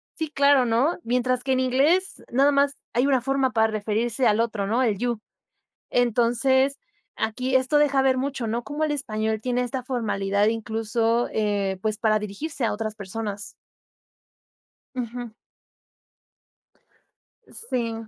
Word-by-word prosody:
sí, 320 -2 -3
claro, 280 -3 +4
¿no? 250 +10 +1
Mientras 250 +1 0
que 265 -1 +1
en 260 - +1
inglés 290 +9 +2
nada 275 +4 +4
más 280 0 +2 0.2
hay 250 +4 +2
una 260 -3 +3
forma 270 0 +1
para 220 -2 +3
referirse 220 +3 0
al 215 +2 +3
otro, 215 -4 -2
¿no?, 240 +5 +1
el 210 -5 +1
you. 240 -1 -1 0.7
Entonces, 245 +3 +2 0.4
aquí 255 +4 0
esto 260 +3 +2
deja 280 -2 +3
ver 265 -1 +3
mucho, 270 -3 -2
¿no? 235 +2 -2
Como 295 +2 -2
el 300 - 0
español 220 -5 -1
tiene 250 -1 0
esta 255 +1 -3
formalidad 205 -5 0
incluso, 225 +1 0
eh, 200 -3 0
pues, 215 -1 -1
para 215 -1 +2
dirigirse 235 +7 -4
a - - +1
otras 215 0 -3
personas. 205 0 -5 1.5
Ujú. 240 -1 -5 2.2
Sí. 245 - -2
240 Hz, 140 wpm, -24 LUFS, 220-265 Hz, 2.2 s, claro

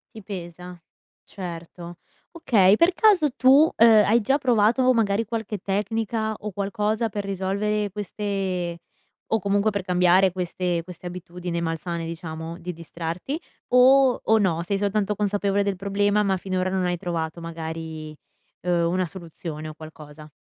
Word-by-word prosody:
Ti 220 - -9
pesa, 180 -2 -8 0.4
certo, 175 -1 -8 0.3
okay. 210 - +4
Per 335 +9 +4
caso 360 -9 +4
tu, 275 +5 +6
ehm, 225 -2 +6
hai 230 +3 +4
già 270 +6 +1
provato, 250 0 +3
magari, 225 -2 +1
qualche 220 -1 -4
tecnico 210 +4 -2 0.2
o 210 0 -6
qualcosa 210 +3 -1
per 205 -1 -4
risolvere 200 +2 -1
queste 195 -3 -3 0.5
o 220 - 0
comunque 200 +2 +1
per 200 -1 -2
cambiare 180 +1 +4
queste 180 -1 -2
queste 180 0 -11
abitudini 175 -1 -5
malsane, 165 +1 -3
diciamo, 165 0 -6
di 180 0 -6
distrarti 170 - -5 0.3
o 260 +1 +6
o 220 0 +3
no? 170 -5 +1
Sei 195 +3 -1
soltanto 205 0 0
consapevole 200 -1 0
del 200 -1 0
problema, 205 +2 +1
ma 195 -2 +1
finora 185 0 -2
non 190 -1 0
hai 175 0 0
trovato, 170 -1 -4
magari, 160 -2 -6 0.5
uhm, 175 -1 +1
una 185 0 0
soluzione 165 -3 -8
o 155 - -7
qualcosa? 155 -1 -12
190 Hz, 145 wpm, -24 LUFS, 170-210 Hz, 0.5 s, tu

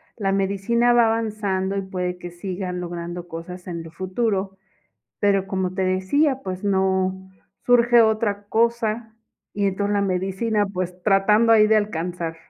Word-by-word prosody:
la 195 -3 -1
medicina 200 +5 +1
va 240 -1 +5
avanzando, 210 -4 -1
y 200 - -1
puede 180 -1 -4
que 175 - -7
sigan 180 0 -5
logrando 175 0 -6
cosas 175 +2 -8
en 170 -2 -4
el 165 -1 -9
futuro, 190 +2 -2 0.6
pero, 195 -1 +2
como 190 -2 -2
te 190 0 -1
decía, 255 +10 +1
pues 185 0 -5
no, 190 -1 0 0.4
surge 240 -1 +5
otra 215 -2 +1
cosa, 225 0 0 0.4
y 205 0 0
entonces 200 +1 0
la 200 - +1
medicina, 195 +3 0
pues, 180 -2 -5
tratando 210 +3 +4
ahí 215 -1 +6
de 220 0 +4
alcanzar. 175 -4 -3
195 Hz, 150 wpm, -23 LUFS, 185-215 Hz, 0.6 s, ahí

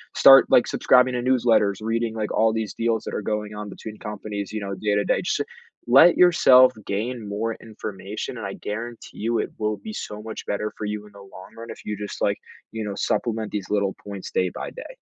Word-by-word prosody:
start, 135 0 +8
like, 120 - +5
subscribing 125 0 +4
to 125 - -1
newsletters, 120 -5 +3
reading, 115 +1 -1
like, 110 -1 -3
all 110 0 +3
these 110 -2 -3
deals 115 -1 0
that - - -6
are - - -2
going 105 0 -3
on 105 0 -6
between 105 +1 -9
companies, 105 -1 -6
you 110 - -3
know, 100 -1 -4
day 105 +2 0
to 105 - +2
day. - - +1
Just - - 0 0.5
let 140 +8 +7
yourself 130 -8 +7 0.2
gain 110 +2 -3
more 110 +3 -2
information 110 +1 -6
and 115 - -6
I 95 - -5
guarantee 115 +4 -7
you, 115 +1 0
it - - -3
will 105 0 0
be 215 - -8
so 105 - -6
much 110 0 -7
better 105 +1 -2
for 105 - -4
you 105 0 -4
in 105 - -16
the 100 - -14
long 95 -1 -13
run 115 0 -9
if - - -11
you 105 -1 -3
just, 105 0 -7
like, - - +1 0.3
you 110 -1 -4
know, 100 - -3
supplement 110 -2 -1
these 100 -3 -4
little 100 -2 0
points 100 -2 -7
day 90 -1 +1
by - - -5
day. - - -10
110 Hz, 225 wpm, -24 LUFS, 105-115 Hz, 0.5 s, start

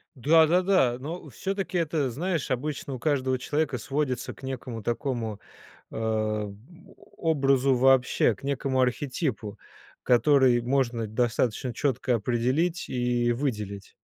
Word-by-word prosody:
Да, 155 +5 +5
да, 180 +3 +3
да. 155 -11 +3
Но 160 +3 -6
все-таки 190 - -3
это, 150 -5 0
знаешь, 165 +3 -2
обычно 140 +3 -3
у 130 - -5
каждого 130 -3 0
человека 145 +1 -1
сводится 135 -1 -2
к - - -19
некому 125 -3 -5
такому, 120 -3 -3 0.5
а, 110 -2 -2 0.6
образу 135 -4 +2
вообще, 130 -3 +4
к - - -20
некоему 135 -1 0
архетипу, 125 - -2 0.4
который 130 -1 +4
можно 120 -2 0
достаточно 120 +2 -1
четко 130 -3 0
определить 125 - 0
и 120 -1 +1
выделить. 105 -6 -4
130 Hz, 120 wpm, -26 LUFS, 120-145 Hz, 0.6 s, Да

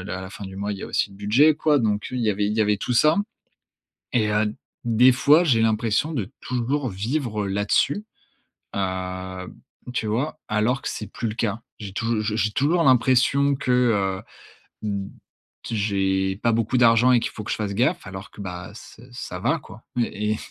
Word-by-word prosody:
l 100 - -8
à 95 0 -4
la 95 - -8
fin 100 - -8
du 95 0 -9
mois, 100 +1 -2
il 100 - -6
y - - -8
a - - -4
aussi - - 0
le 100 - -14
budget, 120 +10 +4
quoi. 150 -1 +2
Donc 105 -4 0
oui, 125 - -3
il - - -1
y 105 - +3
avait 100 0 0
il 105 - -1
y 110 - +4
avait 105 -1 +1
tout 125 - -2
ça 155 +6 +5 1.0
et 110 -4 +2
heu, 105 0 +1 0.3
des 120 +2 +6
fois, 150 +6 +5
j'ai 120 -9 +3
l'impression 115 +6 +1
de 110 -10 -3
toujours 130 +2 -1
vivre 110 +1 -2
là-dessus, 100 - +1 0.7
heu, 95 -1 -3
b - - -11 0.4
tu 115 -3 -2
vois? 130 +9 -1
Alors 110 +5 +1
que - - -3
c'est 110 - -5
plus 115 - -3
le 105 - -4
cas. 110 -1 -1 0.2
J'ai 100 -3 -7
touj 115 +2 -1
j 105 0 -1
j'ai 105 0 +1
toujours 165 +8 +2
l'impression 130 +2 +4
que, 130 - -3
heu, 105 -7 +2 0.7
mmh, 100 -1 -3 0.6
t 115 - -4
j'ai 95 -2 0
pas 115 - +3
beaucoup 115 +3 +1
d'argent 120 +1 +5
et 120 - +5
qu'il - - -3
faut 110 - -7
que - - -5
je - - 0
fasse 100 -2 -3
gaffe 135 - +1
alors 95 +4 -8
que, - - -13
bah 90 -1 -6
ç 110 - -13
ça - - -6
va, - - +1
quoi. 110 - -13
Mais 120 -2 +1 0.2
et 110 - 0
110 Hz, 215 wpm, -24 LUFS, 100-125 Hz, 1.0 s, des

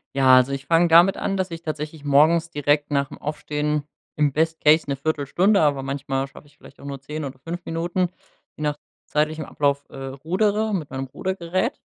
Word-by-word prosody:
Ja, 130 -1 +6
also 130 +1 +4
ich 140 0 -5
fang 170 +1 +4
damit 175 +4 +6
an, 195 - -1
dass 190 -1 -1
ich 165 0 -7
tatsächlich 155 -1 -5
morgens 160 +4 +4
direkt 145 0 +1
nach 140 -1 +1
dem - - -10
Aufstehen 150 0 -2 0.3
im 150 -2 +2
Best 160 +2 0
Case 155 +2 +5
'ne 140 - -1
1/4 145 +1 -2
Stunde, 195 +8 +3
aber 145 -3 +2
manchmal 135 0 -2
schaff 135 - -15
ich 145 - -24
vielleicht 140 - -17
auch - - -12
nur 140 -1 -6
10 150 +2 -5
oder 130 -1 -8
5 170 +5 -7
Minuten, 175 +2 -1 0.5
je 155 - -7
nach 150 -1 0 0.3
zeitlichem 155 0 0
Ablauf, 140 -1 0
äh, - - -13
rudere, 185 +11 -1
mit 155 -6 -4
meinem 135 0 -3
Rudergerät. 185 - -2
150 Hz, 200 wpm, -23 LUFS, 140-170 Hz, 0.5 s, Ja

